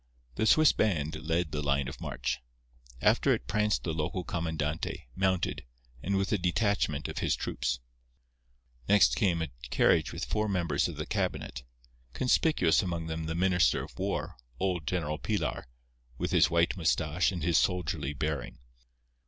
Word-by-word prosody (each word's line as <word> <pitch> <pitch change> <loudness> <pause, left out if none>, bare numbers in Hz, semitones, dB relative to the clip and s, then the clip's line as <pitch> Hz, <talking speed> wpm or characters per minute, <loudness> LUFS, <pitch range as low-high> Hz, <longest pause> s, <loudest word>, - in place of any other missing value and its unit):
The 110 - 0
Swiss 155 +7 +6
band 80 -8 0
led 80 +1 -1
the 75 0 -2
line 70 -2 +1
of 65 - -8
march. 65 +4 -3 0.6
After - - +4
it - - -8
pranced 105 0 +1
the 80 - -2
local 80 +3 -2
comandante, 80 -2 -3
mounted, 95 -2 0 0.4
and 100 +7 -1
a 100 +2 +1
detachment 90 -4 0
of - - -5
his - - +1
troops. 65 -1 -2 1.1
Next 100 -12 +6
came 85 +3 +1
a 80 - -4 0.2
carriage 65 - +3
with - - -4
four 105 0 -1
members 90 -3 +1
of - - -6
the - - -4
cabinet, 60 - -2 0.5
conspicuous 125 - +3
among 85 -3 -3
them 80 0 -4
the 80 0 -3
Minister 90 -7 +3
of - - -12
War, - - -2 0.2
old 90 -5 -1
General 80 -4 -1
Pilar, 105 - -2 0.5
with - - -2
his - - +5
white 85 0 +2
moustache 80 0 +1
and 90 -4 -4
his 85 0 +4
soldierly 90 -6 -1
bearing. 75 -2 -3
85 Hz, 155 wpm, -30 LUFS, 75-95 Hz, 1.1 s, Swiss